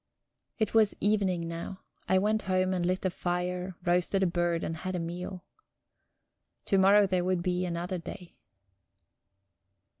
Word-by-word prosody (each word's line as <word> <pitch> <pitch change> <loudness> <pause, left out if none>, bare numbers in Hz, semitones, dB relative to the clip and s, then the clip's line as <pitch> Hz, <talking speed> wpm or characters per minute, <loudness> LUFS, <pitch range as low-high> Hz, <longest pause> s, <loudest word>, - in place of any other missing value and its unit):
It 220 -2 0
was 220 -2 +4
evening 195 -5 +1
now. 170 +3 -6 0.3
I 190 - +5
went 215 +3 +2
home 185 0 +2
and 180 -2 -1
lit 185 +2 0
a 185 - +2
fire, 180 +1 -2
roasted 180 +2 +2
a - - +4
bird, 175 -1 0
and 165 - -3
had 185 +3 -4
a - - -1
meal. 175 +2 -5 1.2
To 195 - +3
morrow 200 +2 +6
there 185 -2 0
would 180 -1 0
be 180 0 0
another 175 +2 -3
day... 180 +1 -9
180 Hz, 150 wpm, -29 LUFS, 175-190 Hz, 1.2 s, morrow